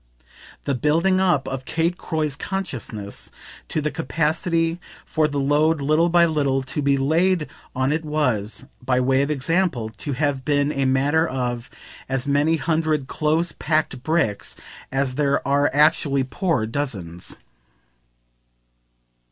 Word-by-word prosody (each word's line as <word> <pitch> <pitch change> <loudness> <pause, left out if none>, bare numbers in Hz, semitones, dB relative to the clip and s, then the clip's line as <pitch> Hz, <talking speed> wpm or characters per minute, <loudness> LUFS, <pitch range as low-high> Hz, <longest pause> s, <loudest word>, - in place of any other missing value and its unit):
The 140 - 0
building 165 +8 +2
up 175 -8 +2
of 135 -1 -4
Kate 165 +5 0
Croy's 155 -5 -2
consciousness 130 - -5 0.4
to 155 - -1
the 150 0 -1
capacity 165 +2 0 0.3
for 155 -1 +1
the 145 -1 -2
load 150 +3 +2
little 155 +4 +3
by 170 0 +5
little 140 -4 +1
to 135 +3 -3
be 140 -1 +3
laid 160 +4 +2 0.3
on 130 +2 +1
it 160 +1 -1
was, 125 -8 -1 0.2
by 125 0 +2
way 130 +1 +3
of 140 - 0
example, 150 -4 0
to 140 +6 -5
have 140 -1 0
been 145 0 +1
a 135 -2 0
matter 145 +5 +2
of 125 -2 -3 0.4
as 135 0 -1
many 145 +3 +3
hundred 155 -1 0
close 155 +4 0
packed 155 -4 -1
bricks 155 -8 0 0.4
as 135 -1 0
there 140 0 0
are 140 +1 +3
actually 145 -2 +3
poor 140 - 0
dozens. 105 - -4
145 Hz, 135 wpm, -23 LUFS, 130-160 Hz, 0.4 s, by